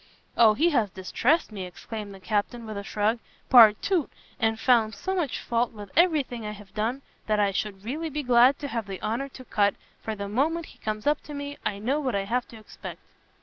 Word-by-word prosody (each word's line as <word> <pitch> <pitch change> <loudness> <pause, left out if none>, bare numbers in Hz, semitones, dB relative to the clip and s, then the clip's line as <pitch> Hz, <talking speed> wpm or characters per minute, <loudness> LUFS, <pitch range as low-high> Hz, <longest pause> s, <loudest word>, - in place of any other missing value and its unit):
"O 220 -2 +6
he 325 +9 +3
has 230 -8 +2
distressed 230 - 0
me," 200 -3 -5
exclaimed 205 +3 -7
the 195 - -11
Captain, 215 +4 -2
with 215 -1 -6
a 200 - -4
shrug, 215 +3 0 0.3
"partout! 245 - +6 0.3
and 225 0 +1
found 225 -4 +3
so 380 - -3
much 325 -10 -1
fault 235 0 0
with 205 -2 -10
every 330 -3 +4
thing 240 -3 -8
I 210 0 -4
have 205 -2 -14
done, 235 +6 -2 0.2
that 215 -1 +2
I 200 -1 +3
should 195 0 -3
really 310 +7 -3
be 300 0 -3
glad 250 +2 +5
to 285 - -3
have 230 -5 -3
the 195 -1 -6
honour 245 +6 -2
to 255 -1 -12
cut, 205 -3 +2 0.3
for 220 - -4
the 200 -1 -5
moment 310 +10 0
he - - -17
comes 215 -1 -4
up 295 +1 +2
to 295 - -7
me, 285 0 -6
I 200 - -1
know 255 +8 0
what 260 -7 -1
I 200 - 0
have 240 +5 -1
to 230 - -12
expect!" 215 - -10
225 Hz, 225 wpm, -26 LUFS, 210-275 Hz, 0.3 s, O